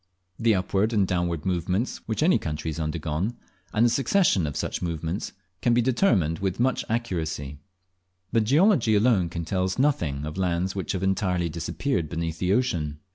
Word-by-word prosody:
The 115 -2 +3
upward 95 +4 0
and 100 -3 +3
downward 85 -3 -1
movements 95 +5 -1
which 110 +6 0
any 180 +3 +4
country 75 0 -3
has 80 - -6
undergone, 80 +7 -2 0.3
and 115 +2 +3
the - - +5
succession 135 - +2
of 75 - -5
such - - -3
movements, 85 +2 -3 0.3
can 120 -1 +3
be 120 - +4
determined 110 - +2
with 95 0 -2
much 130 +2 +1
accuracy; 80 - -3 0.7
but 115 - +3
geology 140 - +4
alone 100 -5 +3
can 85 0 -4
tell 90 +2 0
us 95 0 -1
nothing 85 - +1
of 75 +4 -5
lands 90 0 0
which 95 +1 -2
have 95 -1 -3
entirely 90 -3 0
disappeared 85 - -2
beneath 80 0 -3
the 90 0 +1
ocean. 85 - 0
95 Hz, 175 wpm, -25 LUFS, 80-115 Hz, 0.7 s, the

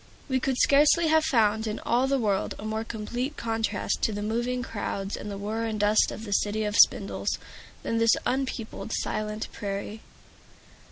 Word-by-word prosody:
We 260 -2 +1
could 260 0 -1
scarcely 300 +5 +5
have 315 0 +4
found 220 -6 +2
in 215 - -2
all 250 +3 +2
the 275 0 +2
world 205 -6 0
a 210 - -8
more 220 0 -2
complete 240 +6 -4
contrast 225 -1 -1
to - - +1
the 205 0 -4
moving 240 +3 -1
crowds 200 -3 -4
and 210 - -7
the 200 - -5
whir 215 +3 -3
and 215 -1 -3
dust 210 +1 +3
of 220 - -7
the 205 - -3
City 210 +2 +1
of 210 -1 -2
Spindles, - - +3 0.5
than 230 - -1
this 230 -1 +5
unpeopled, 250 -4 -3
silent 215 0 -2
prairie. 205 +1 -5
220 Hz, 175 wpm, -27 LUFS, 210-250 Hz, 0.5 s, scarcely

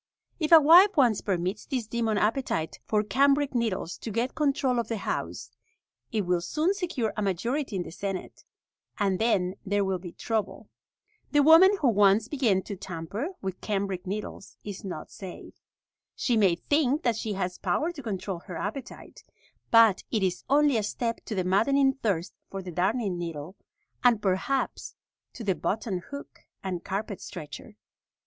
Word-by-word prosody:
If 310 -1 -1
a 330 - +11
wife 350 +6 +7
once 240 -7 +4
permits 185 +1 -2
this 255 -5 -2
demon 225 -1 -1
appetite 210 -7 -1
for 210 -1 +2
cambric 280 +5 +2
needles 225 -8 -2
to - - -6
get 235 +4 -1
control 275 -4 +1
of 230 - -2
the 225 - -2
house, - - -4 0.6
it 220 -3 +1
will 180 -2 0
soon 305 - 0
secure 340 - -2
a 215 - -2
majority 230 - -1
in 180 - -1
the - - -9
senate, 195 +2 -5 0.5
and 195 -3 +1
then 195 -5 +1
there 205 0 0
will 190 -1 -1
be 175 -1 -8
trouble. 220 +2 -3 0.6
The 290 -1 +4
woman 355 +6 +7
who 275 - +4
once 205 0 +4
begins 235 -10 +1
to 205 - -6
tamper 185 - -5 0.2
with 190 -1 -4
cambric 195 -3 -2
needles 200 0 -6
is 205 +1 -7
not 180 -6 -6
safe. 190 -3 -9 0.6
She 245 - 0
may 195 -6 +4
think 290 - +1
that 235 -2 +2
she 220 -1 -3
has 180 -2 -3
power 330 +3 0
to 320 -5 -9
control 195 -5 -4
her 175 -1 -8
appetite, 220 +7 -7 0.5
but 225 -4 +6
it 215 -4 0
is 180 -1 -1
only 285 -2 +4
a - - +1
step 230 +3 -3
to 215 - -4
the 185 - 0
maddening 270 +9 +3
thirst 200 -10 -2 0.2
for 195 -1 -6
the 180 - -7
darning 190 +2 0
needle, 165 +1 -6 0.5
and 240 -3 +5
perhaps 205 +7 -1 0.4
to 235 - -8
the 195 -3 +2
button 200 0 -2
hook 280 0 -9 0.2
and 185 -3 -4
carpet 200 0 -4
stretcher. 155 -5 -9
210 Hz, 170 wpm, -27 LUFS, 190-260 Hz, 0.6 s, a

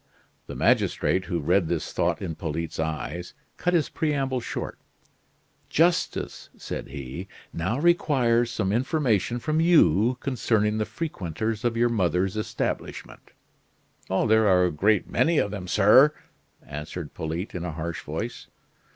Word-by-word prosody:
The - - -7
magistrate, 95 0 +2
who 85 -1 -2
read 85 +3 +2
this 80 -2 -2
thought 85 +2 0
in 85 -4 -3
Polyte's 80 0 -4
eyes, 80 +2 -4 0.2
cut 180 0 +1
his 160 -4 +2
preamble 135 -5 -1
short. 115 - -5 0.9
"Justice," 170 +2 0
said - - -6
he, 70 +6 -7 0.3
"now 95 +9 -1
requires 130 -8 +3
some 105 -5 -1
information 120 - +1
from 155 +5 -1
you 125 - +4
concerning 110 -5 0
the 110 - 0
frequenters 110 - -4
of 120 -1 0
your 120 +1 +3
mother's 95 -3 +1
establishment." 110 - -4 0.8
"There 110 +3 +3
are 90 -2 +5
a 90 - 0
great 100 +6 +2
many 165 0 +2
of 100 - +1
them, 95 -3 -6
sir," 110 +11 +6 0.5
answered 75 +2 -7
Polyte 80 +5 -4
in 90 - -4
a 85 -3 -4
harsh 80 0 -4
voice. - - -5
105 Hz, 135 wpm, -26 LUFS, 85-125 Hz, 0.9 s, sir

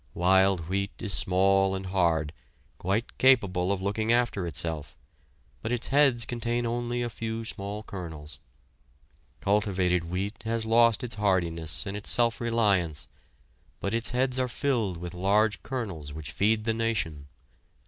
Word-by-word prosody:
Wild 95 +1 +4
wheat 100 +2 -2
is 100 -3 -1
small 95 +1 +3
and 95 0 -5
hard, 85 -5 +1 0.5
quite 100 +6 -2
capable 100 -8 +4
of 95 -1 -2
looking 110 +3 0
after 120 -6 +1
itself, 75 -2 -2 0.6
but 110 - -3
its 120 -2 -2
heads 135 -4 +4
contain 120 0 -2
only 120 +1 -2
a - - -1
few 115 +1 -4
small 100 0 -5
kernels. 80 -7 -8 1.0
Cultivated 95 -4 +1
wheat 100 +5 -3
has 115 0 -2
lost 115 +1 +4
its 120 - -3
hardiness 85 -5 0
and 100 0 -4
its 105 - -1
self 120 0 +2
reliance, 100 -10 +1 0.7
but 100 - -2
its 115 0 -1
heads 130 +1 0
are 130 - +1
filled 120 -8 -1
with 90 +1 -7
large 100 +4 +2
kernels 95 - -5
which 75 -2 -7
feed 105 +6 +1
the 110 0 +1
nation. 110 -11 -2
100 Hz, 145 wpm, -27 LUFS, 90-115 Hz, 1.0 s, Wild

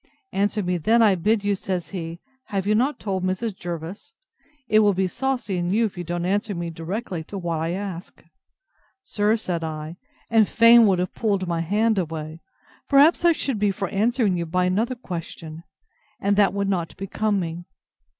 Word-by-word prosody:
Answer 205 +1 0
me 180 -1 -1
then, 225 +8 +4
I 210 -3 +5
bid 205 +4 +1
you, 205 0 +1
says 185 -3 -3
he, 170 -3 -6 0.2
Have 195 -2 -3
you 210 - +2
not 255 +7 +1
told 190 -3 -2
Mrs. 190 +3 -2
Jervis? 175 - -7 0.5
It 215 - +4
will 205 -2 +4
be 190 +1 +1
saucy 245 -1 -2
in 175 0 -1
you 225 +3 +3
if 205 - -4
you 175 - -5
don't 175 +1 -3
answer 205 +2 0
me 170 -1 -4
directly 175 +2 -4
to 200 - -7
what 170 -3 -2
I 165 +2 -1
ask. 190 -2 -6 0.8
Sir, 210 -3 +1
said 180 -7 -3
I, 155 +1 -5 0.3
and 225 -2 +4
fain 230 0 +7
would 190 -2 +3
have 180 +1 -2
pulled 200 -5 -1
my 170 -1 -1
hand 210 +5 +1
away, 160 -1 -5 0.5
perhaps 290 +5 +5
I 345 - +6
should 270 -7 -2
be 205 0 +2
for 195 0 -3
answering 220 -1 +1
you 170 -1 -3
by 180 +2 +1
another 220 +8 0
question, 165 -6 -7 0.6
and 200 +1 +1
that 200 -1 +4
would 200 0 -1
not 175 -4 -2
become 200 +1 -1
me. 170 0 -5
195 Hz, 190 wpm, -23 LUFS, 175-215 Hz, 0.8 s, fain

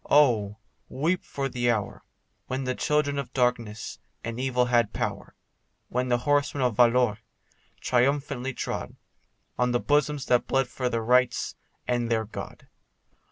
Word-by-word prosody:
Oh! 110 -8 +4 0.3
weep 170 +6 0
for 140 -1 -3
the 120 -2 0
hour, 105 -4 -1 0.4
When 130 +1 -2
the 130 0 -1
children 145 0 +1
of 140 - -5
darkness 120 -4 -1 0.2
and 115 +1 -4
evil 125 -1 +1
had 120 -3 +2
power, - - -4 0.5
When 125 +1 -1
the 120 - +3
horsemen 145 +1 +1
of 125 -4 +1
Valois 120 -3 +4 0.6
triumphantly 135 0 0
trod - - -4 0.6
On 125 0 +2
the 120 - +2
bosoms 145 -1 +1
that 125 -2 +2
bled 135 -1 +2
for 125 0 -2
their 115 -2 -1
rights 125 +1 +2 0.3
and 120 -1 0
their 110 -1 +1
God. 105 - -9
125 Hz, 145 wpm, -27 LUFS, 120-135 Hz, 0.6 s, Oh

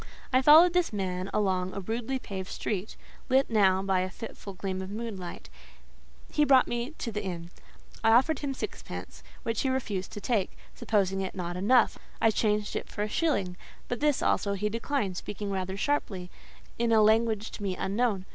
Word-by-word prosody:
I 255 - +5
followed 320 +6 +8
this 360 -5 +2
man 185 -2 -2
along 190 -3 0
a - - -2
rudely 230 +6 -2
paved 190 -6 -6
street, 205 0 -3 0.3
lit 265 -1 +3
now 190 -3 +4
by 190 -1 +2
a 185 0 -1
fitful 200 0 -8
gleam 190 0 -3
of 190 - -6
moonlight; 200 - -6 0.8
he 300 - +3
brought 265 -3 +6
me 240 +6 -3
to 230 - -4
the 210 0 -3
inn. 175 -2 -5 0.5
I 225 - +5
offered 265 +5 +4
him 275 -2 -3
sixpence, - - -7 0.2
which 230 -1 -1
he 265 - +1
refused 215 -8 -2
to - - -5
take; 210 -4 0 0.2
supposing 195 -3 0
it 190 - -4
not 175 -2 -4
enough, 220 +6 +3 0.2
I 225 - +4
changed 210 -1 0
it - - -4
for 210 - -3
a - - -1
shilling; 200 - 0 0.3
but 245 - -3
this 295 -2 +2
also 200 - +1
he 205 +2 -1
declined, 230 -4 -2
speaking 205 +1 -5
rather 190 0 -2
sharply, 195 -8 -1 0.5
in 235 -1 +2
a 220 -1 +6
language 220 0 +2
to - - -9
me 190 -2 -2
unknown. 200 -1 0
210 Hz, 185 wpm, -29 LUFS, 190-240 Hz, 0.8 s, followed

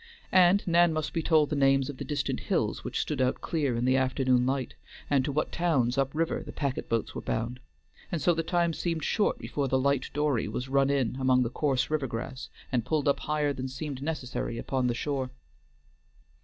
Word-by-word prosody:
And 185 +2 +5
Nan 170 -1 +4
must 155 -1 -2
be 165 - 0
told 155 -2 +3
the - - +1
names 135 -1 +3
of 145 - -6
the - - -5
distant 145 -2 -2
hills - - -1
which - - -3
stood 145 -4 -1
out 130 0 +1
clear 145 -7 -1
in 120 +1 0
the 130 +1 +3
afternoon 130 -1 +2
light, 135 -1 -1 0.4
and 140 -2 +4
to 145 - -2
what 150 +2 -1
towns 140 -9 +1
up 135 -1 +1
river 165 +1 0
the 150 - -8
packet 140 -3 -3
boats 115 -1 -1
were - - -5
bound, 115 +3 -3 0.5
and 170 - -1
so 175 - +3
the 165 - 0
time 170 0 +1
seemed 165 -1 -2
short 210 - +1
before 140 -2 -2
the 130 - +2
light 140 0 +1
dory 145 -7 0
was 125 +5 -4
run 135 0 +3
in 130 -3 0
among 130 -1 +3
the 120 - -3
coarse 135 -1 0
river 150 -3 0
grass 125 +3 -6 0.2
and 125 -3 +1
pulled 145 +4 0
up 140 - +3
higher 150 -1 0
than 130 -1 -4
seemed 135 0 -5
necessary 135 -6 -3
upon 130 +1 -1
the 120 - 0
shore. 135 0 -2
140 Hz, 210 wpm, -28 LUFS, 130-155 Hz, 0.5 s, And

